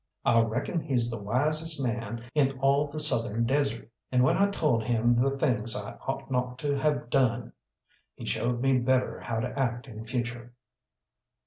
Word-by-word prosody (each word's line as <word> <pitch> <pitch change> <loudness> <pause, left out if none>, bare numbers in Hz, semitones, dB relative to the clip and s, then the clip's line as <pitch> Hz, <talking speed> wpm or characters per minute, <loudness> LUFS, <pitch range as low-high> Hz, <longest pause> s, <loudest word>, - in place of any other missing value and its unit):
I 115 - +4
reckon 120 +9 -2
he's 120 -6 -1
the 115 - -6
wisest 155 +9 +1
man 115 -1 -4
in 135 -3 +1
all 140 +2 +2
the 150 +2 -6
southern 115 -6 +6
desert, 135 -3 -1 0.2
and 125 -1 +3
when 130 - +3
I 200 +1 +2
told 150 - 0
him 120 +1 +1
the 135 +3 +1
things 120 -5 0
I - - -5 0.2
ought 135 0 -4
not 125 -1 -2
to 145 +1 -2
have 140 -4 -1
done, 125 -3 +1 0.6
he - - -9
showed 120 0 -1
me 135 -1 +2
better 130 +1 0
how 115 -1 -3
to 125 - -3
act 120 -1 -1
in 110 -2 -9
future. 120 0 -5
125 Hz, 175 wpm, -27 LUFS, 120-135 Hz, 0.6 s, southern